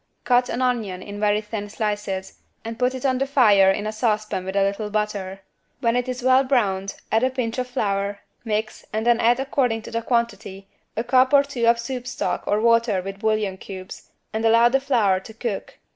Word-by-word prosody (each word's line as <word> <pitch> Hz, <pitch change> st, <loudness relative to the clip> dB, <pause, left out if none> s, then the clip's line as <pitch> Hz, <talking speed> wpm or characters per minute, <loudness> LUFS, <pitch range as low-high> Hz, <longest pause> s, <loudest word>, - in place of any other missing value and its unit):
Cut 245 Hz, 0 st, +3 dB
an 255 Hz, -, -1 dB
onion 215 Hz, -7 st, -1 dB
in 205 Hz, 0 st, -8 dB
very 210 Hz, 0 st, +2 dB
thin 210 Hz, -1 st, -6 dB
slices 205 Hz, -3 st, -3 dB, 0.3 s
and 230 Hz, +1 st, -6 dB
put 250 Hz, +1 st, +1 dB
it 260 Hz, -, -6 dB
on 260 Hz, -1 st, +2 dB
the 275 Hz, -, 0 dB
fire 210 Hz, -8 st, +5 dB
in 205 Hz, +2 st, 0 dB
a 215 Hz, -, -2 dB
saucepan 215 Hz, -4 st, -1 dB
with 190 Hz, +1 st, -5 dB
a 200 Hz, -, +3 dB
little 200 Hz, +2 st, -2 dB
butter. 205 Hz, -2 st, -3 dB, 0.4 s
When 235 Hz, -3 st, +1 dB
it 250 Hz, +1 st, -1 dB
is 250 Hz, 0 st, -4 dB
well 260 Hz, +1 st, +5 dB
browned 200 Hz, -8 st, 0 dB, 0.2 s
add 225 Hz, -, +3 dB
a 260 Hz, -, +3 dB
pinch 250 Hz, -2 st, -3 dB
of 250 Hz, -, -2 dB
flour, 200 Hz, -5 st, -2 dB, 0.2 s
mix 215 Hz, -1 st, -3 dB
and 220 Hz, +1 st, -2 dB
then 240 Hz, -1 st, +4 dB
add 240 Hz, +2 st, +3 dB
according 250 Hz, -4 st, 0 dB
to -, -, -9 dB
the 230 Hz, -, -1 dB
quantity, 215 Hz, -5 st, -2 dB, 0.3 s
a 225 Hz, -, 0 dB
cup 255 Hz, +2 st, +3 dB
or 280 Hz, 0 st, +7 dB
two 255 Hz, -5 st, -2 dB
of 235 Hz, 0 st, +5 dB
soup 245 Hz, +1 st, -5 dB
stock -, -, -3 dB
or 205 Hz, -, +2 dB
water 230 Hz, -3 st, +3 dB
with 195 Hz, +1 st, -7 dB
bouillon 215 Hz, -3 st, 0 dB
cubes 185 Hz, -1 st, -10 dB, 0.2 s
and 220 Hz, +1 st, -2 dB
allow 230 Hz, +1 st, +5 dB
the 270 Hz, +2 st, +2 dB
flour 230 Hz, -9 st, +2 dB
to 215 Hz, +3 st, -13 dB
cook. 225 Hz, -3 st, -5 dB
225 Hz, 210 wpm, -23 LUFS, 205-245 Hz, 0.4 s, or